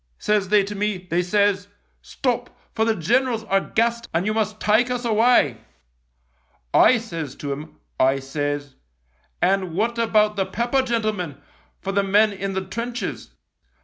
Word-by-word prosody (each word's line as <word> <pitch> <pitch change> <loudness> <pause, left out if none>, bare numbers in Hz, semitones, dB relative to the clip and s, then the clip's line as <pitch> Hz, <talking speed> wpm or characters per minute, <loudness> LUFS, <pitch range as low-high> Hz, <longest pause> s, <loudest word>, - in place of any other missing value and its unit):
Says 210 -3 0
they 210 -1 +5
to 200 +2 -5
me, 205 0 -1
they 180 -1 -1
says, 200 +2 +1 0.2
' - - -43
Stop, 245 -2 -1 0.2
for 220 - +1
the 225 -1 +2
generals 230 +6 +1
are 195 -2 +2
gassed 235 +2 0
and 170 +3 +1
you 215 - 0
must 215 -1 -1
take 220 +4 +3
us 250 -1 -2
away.' 220 - +3 0.6
" 65 -1 -42 0.2
I 255 - +5
says 165 - -6
to 145 - -5
'em, 150 +3 -7 0.2
I 135 +1 +4
says, 145 +1 -3 0.3
' - - -43 0.3
And 185 -2 +1
what 230 +4 0
about 215 -2 +2
the 195 - +1
pepper, 240 +7 0
gentlemen, 215 - -2 0.4
for 195 - -2
the 200 +1 +2
men 205 +2 +3
in 195 0 -4
the 190 0 -3
trenches 235 +5 -5
205 Hz, 170 wpm, -23 LUFS, 170-225 Hz, 0.6 s, they